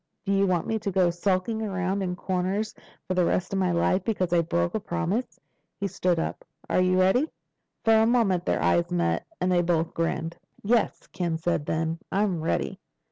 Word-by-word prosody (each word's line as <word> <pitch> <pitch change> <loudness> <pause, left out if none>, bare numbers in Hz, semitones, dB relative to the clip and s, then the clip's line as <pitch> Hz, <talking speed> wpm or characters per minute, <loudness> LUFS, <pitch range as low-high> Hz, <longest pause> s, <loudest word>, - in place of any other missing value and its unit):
Do 200 - 0
you 195 0 +3
want 180 -3 +1
me 220 0 -1
to 205 - -2
go 180 -2 +3
skulking 185 +5 0
around 190 -2 -1
in 180 -2 -2
corners 190 +4 -1 0.3
for 185 - 0
the 180 -1 +3
rest 180 +2 0
of 195 - +1
my 185 -2 +2
life 180 +2 +2
because 185 -6 -1
I 170 - +5
broke 85 - 0
a - - 0
promise?" 195 - -2 0.4
He 200 - -1
stood 185 -2 0
up. 165 - -3 0.2
"Are - - +2
you 185 0 +3
ready?" 220 +12 +3 0.6
For 225 - +6
a 220 0 +4
moment 220 -7 +2
their 85 - +1
eyes 85 0 +2
met 85 -1 0
and 180 0 +1
they 175 -1 +4
both 165 -1 0
grinned. 165 0 -2 0.3
"Yes," 230 +2 +1
Ken 170 -3 -2
said 160 -2 -1
then. 160 +1 -1
"I'm 195 -4 +1
ready." 160 - -1
185 Hz, 195 wpm, -26 LUFS, 170-195 Hz, 0.6 s, For